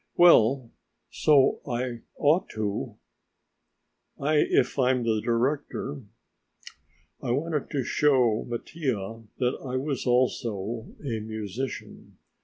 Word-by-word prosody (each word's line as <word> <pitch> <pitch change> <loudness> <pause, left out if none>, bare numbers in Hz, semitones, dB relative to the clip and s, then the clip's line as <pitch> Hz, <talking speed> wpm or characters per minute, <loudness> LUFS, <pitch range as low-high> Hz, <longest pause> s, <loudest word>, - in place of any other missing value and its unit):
"Well 130 -7 +5 0.4
so 145 -3 +4
I 120 -1 -3 0.2
ought 160 +7 +3
to, 105 -2 -3 1.2
if 150 0 +2
I'm 125 -1 +3
the 110 -2 +1
director." 135 +3 -1 1.2
I 130 - -4
wanted 150 +4 -1
to 140 -3 -1
show 125 -5 +2
Mattia 120 -4 -3 0.2
that 125 -1 0
I 130 -1 -4 0.3
also 125 -2 +1
was 110 +5 -6
a 115 -5 -2
musician. 110 +3 -6
125 Hz, 95 wpm, -27 LUFS, 115-140 Hz, 1.2 s, Well